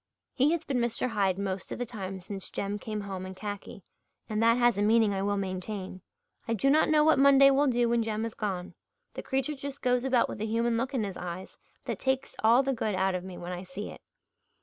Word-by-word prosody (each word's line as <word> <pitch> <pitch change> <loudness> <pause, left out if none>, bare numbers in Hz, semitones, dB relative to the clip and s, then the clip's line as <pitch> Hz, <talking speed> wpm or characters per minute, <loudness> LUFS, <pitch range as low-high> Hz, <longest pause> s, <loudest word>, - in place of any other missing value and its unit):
He 280 +3 +3
has 330 -1 -2
been 265 -3 0
Mr. 235 +1 0
Hyde 195 -5 +1
most 195 -1 -4
of - - -3
the 245 - -2
time 195 -5 -6
since 195 +1 -7
Jem 200 +1 -3
came 215 -1 -4
home 195 -2 -5
in 185 0 -7
khaki, 205 -1 -7 0.4
and 215 0 -1
that 230 +1 +5
has 240 -4 +3
a - - +2
meaning 215 0 +4
I 195 - -1
will 205 +1 0
maintain. 185 0 -4 0.5
I 230 - +1
do 275 +6 +2
not 310 +2 +4
know 305 -1 +5
what 315 -3 +4
Monday 275 0 +7
will 280 +2 +3
do 240 -2 +2
when 235 0 +2
Jem 220 0 -2
is 230 - -5
gone. 185 -4 -4 0.4
The - - -5
creature 270 +2 -1
just 280 0 -7
goes 250 -1 +2
about 260 -2 +3
with - - -7
a - - 0
human 230 +1 +1
look 265 +4 -1
in 235 - +1
his 195 -3 -4
eyes 180 +1 -6 0.3
that - - -3
takes 265 0 -1
all 235 +4 +6
the 270 0 0
good 220 -4 -1
out 190 0 +1
of 180 -1 -3
me 185 -1 -8
when 175 +1 -6
I 180 0 -4
see 190 +3 -7
it. - - -12
220 Hz, 240 wpm, -29 LUFS, 195-255 Hz, 0.5 s, Monday